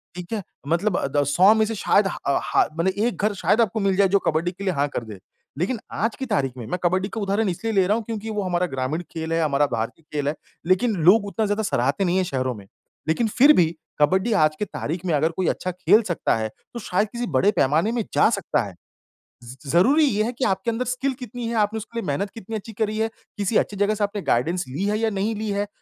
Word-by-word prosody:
ठीक 180 Hz, +3 st, -8 dB
है? 210 Hz, -, -1 dB, 0.3 s
मतलब 175 Hz, +4 st, +1 dB
अ, -, -, -1 dB
द 145 Hz, +1 st, +1 dB
100 185 Hz, +8 st, +6 dB
में 220 Hz, 0 st, +3 dB
से 225 Hz, -, -3 dB
शायद 200 Hz, 0 st, +3 dB
हा -, -, -4 dB, 0.2 s
अ, -, -, -2 dB, 0.2 s
ह -, -, +6 dB
मतलब 175 Hz, -, +2 dB, 0.2 s
एक 240 Hz, -, -1 dB
घर 210 Hz, -1 st, +2 dB
शायद 220 Hz, +4 st, +2 dB
आपको 220 Hz, 0 st, 0 dB
मिल 195 Hz, -2 st, +1 dB
जाए 200 Hz, -1 st, +5 dB
जो 200 Hz, 0 st, +4 dB
कबड्डी 165 Hz, +3 st, +1 dB
के 195 Hz, +2 st, -9 dB
लिए 185 Hz, -, +1 dB
हाँ 145 Hz, 0 st, +1 dB
कर 120 Hz, -, -4 dB
दे। 105 Hz, -3 st, -9 dB, 0.4 s
लेकिन 215 Hz, +6 st, -1 dB
आज 225 Hz, +1 st, -1 dB
की 265 Hz, -, -4 dB
तारीख 135 Hz, -, 0 dB
में 115 Hz, -, -6 dB
मैं 180 Hz, -, -2 dB
कबड्डी 185 Hz, +3 st, +1 dB
का 220 Hz, -, -5 dB
उदाहरण 200 Hz, +1 st, 0 dB
इसलिए 225 Hz, +6 st, -3 dB
ले 190 Hz, -2 st, +4 dB
रहा 210 Hz, -, +3 dB
हूँ 230 Hz, -, -4 dB
क्योंकि 225 Hz, -1 st, -5 dB
वो 210 Hz, -2 st, -2 dB
हमारा 180 Hz, -1 st, 0 dB
ग्रामीण 135 Hz, +4 st, -2 dB
खेल 160 Hz, 0 st, -4 dB
है, 165 Hz, -, +1 dB
हमारा 145 Hz, -1 st, +2 dB
भारतीय 115 Hz, +8 st, -3 dB
खेल 145 Hz, -1 st, -1 dB
है, 150 Hz, -, 0 dB, 0.3 s
लेकिन 205 Hz, +4 st, +2 dB
लोग 205 Hz, +3 st, +6 dB
उतना 200 Hz, +2 st, -1 dB
ज़्यादा 205 Hz, +2 st, -1 dB
सराहते 140 Hz, +3 st, 0 dB
नहीं 180 Hz, +2 st, +1 dB
है 190 Hz, -, +2 dB
शहरों 130 Hz, -6 st, -2 dB
में। 100 Hz, -2 st, -12 dB, 0.4 s
लेकिन 220 Hz, +8 st, +1 dB
फिर 275 Hz, +7 st, +6 dB
भी 170 Hz, -3 st, +5 dB, 0.3 s
कबड्डी 190 Hz, +9 st, +3 dB
आज 155 Hz, 0 st, +2 dB
की 210 Hz, -, 0 dB
तारीख 170 Hz, +1 st, -5 dB
में 170 Hz, -, 0 dB
अगर 155 Hz, +3 st, +2 dB
कोई 185 Hz, +1 st, -2 dB
अच्छा 185 Hz, -, -1 dB
खेल 185 Hz, +5 st, +4 dB
सकता 170 Hz, -, +1 dB
है, 110 Hz, 0 st, -2 dB, 0.2 s
तो 235 Hz, -, -5 dB
शायद 205 Hz, 0 st, 0 dB
किसी 240 Hz, 0 st, -4 dB
बड़े 205 Hz, +10 st, +4 dB
पैमाने 155 Hz, +8 st, +2 dB
में 235 Hz, -2 st, -1 dB
जा -, -, +5 dB
सकता 200 Hz, -, 0 dB
है। 100 Hz, -3 st, -8 dB, 0.7 s
ज़ 120 Hz, +2 st, -10 dB
ज़रूरी 260 Hz, -, +4 dB
ये 215 Hz, -5 st, +1 dB
है 235 Hz, -, -1 dB
कि 255 Hz, -, -1 dB
आपके 215 Hz, +5 st, 0 dB
अंदर 250 Hz, +3 st, -2 dB
स्किल 255 Hz, +2 st, -1 dB
कितनी 245 Hz, -1 st, -6 dB
है? 230 Hz, -, -2 dB
आपने 215 Hz, 0 st, +1 dB
उसके 230 Hz, +2 st, -6 dB
लिए -, -, -5 dB
मेहनत 195 Hz, +8 st, -1 dB
कितनी 225 Hz, 0 st, -7 dB
अच्छी 220 Hz, +1 st, -6 dB
करी 215 Hz, 0 st, -1 dB
है, 220 Hz, 0 st, +1 dB, 0.3 s
किसी 205 Hz, +2 st, +1 dB
अच्छी 205 Hz, -, 0 dB
जगह 205 Hz, +1 st, +2 dB
से 210 Hz, -, -1 dB
आपने 205 Hz, 0 st, -2 dB
गाइडेंस 170 Hz, +9 st, 0 dB
ली 145 Hz, +9 st, -4 dB
है 210 Hz, +1 st, +1 dB
या 225 Hz, -1 st, +1 dB
नहीं 210 Hz, +2 st, -1 dB
ली 215 Hz, 0 st, -3 dB
है? 200 Hz, +1 st, -1 dB
195 Hz, 260 wpm, -23 LUFS, 165-220 Hz, 0.7 s, 100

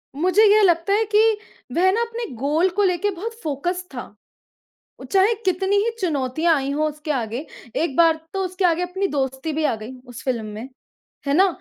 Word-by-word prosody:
मुझे 370 Hz, +8 st, +3 dB
ये 430 Hz, -, +5 dB
लगता 345 Hz, +1 st, +3 dB
है 435 Hz, -, +3 dB
कि 420 Hz, -, +6 dB, 0.6 s
वह 375 Hz, +2 st, +4 dB
ना 455 Hz, -, 0 dB
अपने 470 Hz, 0 st, -3 dB
गोल 300 Hz, +9 st, +1 dB
को 410 Hz, -, +4 dB
लेके 380 Hz, +2 st, +1 dB
बहुत 420 Hz, +6 st, -5 dB
फ़ोकस 345 Hz, +5 st, -2 dB
था। 245 Hz, -, -4 dB, 1.0 s
उ -, -, -9 dB
चाहे 390 Hz, +3 st, +4 dB
कितनी 380 Hz, +2 st, +1 dB
ही 420 Hz, +3 st, +2 dB
चुनौतियाँ 315 Hz, 0 st, +1 dB
आई 275 Hz, -1 st, -2 dB
हो 305 Hz, +2 st, +1 dB
उसके 300 Hz, +1 st, -5 dB
आगे 245 Hz, +1 st, -3 dB, 0.3 s
एक 310 Hz, -4 st, -1 dB
बार 330 Hz, -1 st, +4 dB
तो 385 Hz, -1 st, -1 dB
उसके 370 Hz, +1 st, -1 dB
आगे 340 Hz, 0 st, +2 dB
अपनी 380 Hz, +2 st, -1 dB
दोस्ती 265 Hz, 0 st, -2 dB
भी 310 Hz, +1 st, -1 dB
आ 235 Hz, -, +1 dB
गई 225 Hz, +4 st, -7 dB, 0.2 s
उस 245 Hz, -, -9 dB
फ़िल्म 240 Hz, -4 st, -1 dB
में, 215 Hz, +4 st, -7 dB, 0.6 s
है 280 Hz, -, +2 dB
ना? 380 Hz, +6 st, +5 dB
335 Hz, 195 wpm, -22 LUFS, 280-380 Hz, 1.0 s, कि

